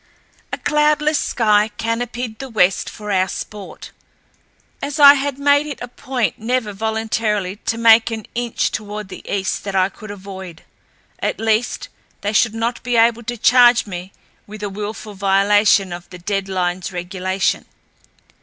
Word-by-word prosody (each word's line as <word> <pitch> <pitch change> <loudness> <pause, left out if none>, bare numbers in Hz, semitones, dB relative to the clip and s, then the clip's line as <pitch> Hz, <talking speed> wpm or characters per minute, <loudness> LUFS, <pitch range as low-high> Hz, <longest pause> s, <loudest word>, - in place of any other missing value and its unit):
A - - -2
cloudless 300 0 +2
sky 210 -3 +2
canopied 230 0 -3
the 270 - -6
west 195 -5 +2
for 210 -2 -7
our 185 -1 +2
sport, 205 0 -8 0.9
as 285 +2 -4
I 285 -1 +10
had 280 -1 -2
made 285 +1 +3
it 290 - -5
a 245 - -6
point 255 -1 -3
never 225 -1 -1
voluntarily 220 -2 -1
to 225 0 0
make 230 0 +6
an 220 -2 -5
inch 240 -1 -1
toward 210 -1 -5
the - - -9
east 195 -1 -1
that 200 -1 -4
I 190 0 +3
could 215 +1 -12
avoid. 190 -4 -9 0.6
At - - -2
least, 225 +1 0 0.3
they 205 +1 -2
should 220 +1 +3
not 230 +1 -2
be 245 0 -1
able 230 0 +4
to 240 +1 -5
charge 245 +1 +5
me 185 -1 -7 0.4
with 210 0 -9
a 205 - -2
willful 210 +1 -6
violation 195 0 +3
of 175 0 -9
the 180 - -10
dead 195 +2 -3
lines 180 -1 -2
regulation. 185 +1 -2
215 Hz, 155 wpm, -19 LUFS, 195-240 Hz, 0.9 s, I